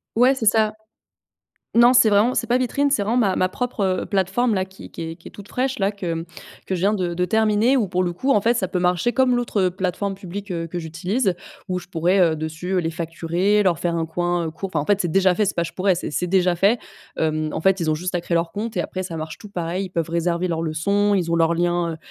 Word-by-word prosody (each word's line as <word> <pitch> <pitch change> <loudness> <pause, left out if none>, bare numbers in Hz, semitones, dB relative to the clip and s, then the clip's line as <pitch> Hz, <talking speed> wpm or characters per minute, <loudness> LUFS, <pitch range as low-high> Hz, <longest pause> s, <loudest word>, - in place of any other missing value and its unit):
Ouais, 250 +3 +5
c'est 240 -4 -4
ça. 215 0 +3 1.0
Non, 240 +2 +7
c'est 235 -3 +6
vraiment 215 +5 +3
c'est 235 - 0
pas 245 +2 +2
vitrine. 275 +3 +1
C'est 225 -8 +2
vraiment 225 +4 0
ma 195 -5 +2
ma 185 - +2
propre, 240 -2 -2 0.2
heu, - - -6
plateforme-là 195 +1 +1
qui 190 0 -13
qui - - -7
est 165 - -8
qui 165 - -12
est - - -16
toute 205 0 -12
fraîche, 260 0 -1
là, 195 +1 +1
que 170 -4 -4 0.4
que 190 - -1
je 175 - -3
viens 200 +3 +2
de 180 -4 -1
de 180 +1 0
terminer, 220 +5 +3
où, 220 -6 +1
pour 185 0 0
le 175 -1 -1
coup, 265 +10 -1
en 205 - +3
fait, 235 +4 +2
ça 190 -6 -1
peut 180 - -2
marcher 180 +6 +1
comme 255 -2 +3
l'autre, 240 -4 -1
heu, 180 - +1
plateforme 190 +2 -2
publique, 195 +1 -8
heu, 165 -2 -3
que 175 +2 -5
j'utilise, 180 +6 -1 0.3
où 180 0 -1
je 175 - -11
pourrais, 180 +2 +1
heu, 165 -3 +3
dessus 165 +4 -2
les 165 -1 -2
facturer, 170 +5 0
leur 175 -5 +2
faire 170 +1 -1
un 165 -1 -1
coin, 175 +1 -1
heu, - - -3
court, 190 +4 -6
enfin, 150 - +1
en 145 - -5
fait, 205 -1 +2
c'est 175 - -2
déjà 190 -2 +4
fait, 215 - +1
c'est 205 - -1
pas 170 - 0
je 165 - -5
pourrais, 190 0 +2
c'est 175 - -4
c'est 180 +4 -1
déjà 180 -1 +2
fait, 200 +7 +3 0.4
hem, 155 -1 0
en - - -3
fait, 190 +2 +2
ils 160 -2 0
ont - - +2
juste 180 +4 -4
à 175 - +1
créer 170 - -2
leur 165 0 +1
compte 215 0 -5
et - - +2
après, 185 +2 -4
ça 170 -3 -6
marche 155 0 -6
tout 210 - -12
pareil. 180 +1 -3
Ils - - -12
peuvent 165 -2 -2
réserver 170 +1 0
leurs 165 -1 -1
leçons, 200 +6 +1
ils 175 -3 0
ont 170 - +2
leurs 165 0 +3
liens, 175 -1 0
heu, - - -7
185 Hz, 275 wpm, -22 LUFS, 170-205 Hz, 1.0 s, Non